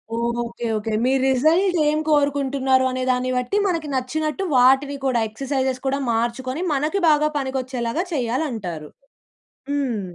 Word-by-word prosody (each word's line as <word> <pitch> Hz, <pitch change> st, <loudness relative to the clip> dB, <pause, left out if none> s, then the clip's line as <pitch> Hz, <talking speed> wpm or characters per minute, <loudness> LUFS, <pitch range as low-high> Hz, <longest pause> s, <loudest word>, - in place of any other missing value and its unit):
Okay. 235 Hz, 0 st, -2 dB
Okay. 215 Hz, +1 st, -3 dB
మీ 260 Hz, -, +2 dB
result 325 Hz, +8 st, +3 dB
ఏం 305 Hz, +1 st, +1 dB
కోరుకుంటున్నారు 275 Hz, -3 st, +2 dB
అనే 255 Hz, 0 st, -2 dB
దాన్ని 255 Hz, 0 st, -1 dB
బట్టి 250 Hz, +11 st, -1 dB
మనకి 330 Hz, -5 st, -1 dB
నచ్చినట్టు 305 Hz, +7 st, -2 dB
వాటిని 270 Hz, +3 st, +4 dB
కూడా 245 Hz, -3 st, +2 dB
ఎక్సర్సైజెస్ 265 Hz, +2 st, -2 dB
కూడా 275 Hz, +1 st, 0 dB
మార్చుకొని, 255 Hz, +6 st, -2 dB
మనకి 305 Hz, +8 st, 0 dB
బాగా 300 Hz, 0 st, +3 dB
పనికొచ్చేలాగా 260 Hz, +1 st, -2 dB
చేయాలంటారు. 230 Hz, -, -3 dB, 0.8 s
హ్మ్. 265 Hz, -7 st, -1 dB
265 Hz, 125 wpm, -22 LUFS, 240-290 Hz, 0.8 s, వాటిని